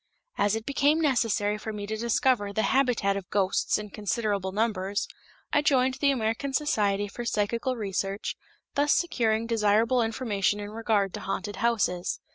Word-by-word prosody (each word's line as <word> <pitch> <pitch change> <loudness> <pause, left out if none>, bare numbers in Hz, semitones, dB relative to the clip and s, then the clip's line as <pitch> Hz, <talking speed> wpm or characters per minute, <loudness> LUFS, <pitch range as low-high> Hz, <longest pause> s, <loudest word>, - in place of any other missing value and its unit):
As 205 +1 +2
it 225 0 -5
became 285 +2 +2
necessary 225 -8 +1
for 220 +1 -5
me 205 -1 -5
to 215 +1 -3
discover 230 -1 +1
the 220 +2 0
habitat 245 -7 +2
of 195 -2 -6
ghosts 195 -2 +1
in 210 -1 -7
considerable 205 -2 -1
numbers, 205 -2 -1 0.5
I 290 - +4
joined 265 -2 +2
the 285 - +4
American 255 +2 -1
Society 205 -9 +1
for 240 +4 -7
Psychical 235 +3 -1
Research, 195 -2 -3 0.4
thus 290 +1 +3
securing 230 -10 +1
desirable 230 +2 +2
information 220 -3 0
in 205 0 -6
regard 215 -3 0
to - - -4
haunted 195 +1 -4
houses. 205 -7 0
220 Hz, 155 wpm, -27 LUFS, 205-245 Hz, 0.5 s, I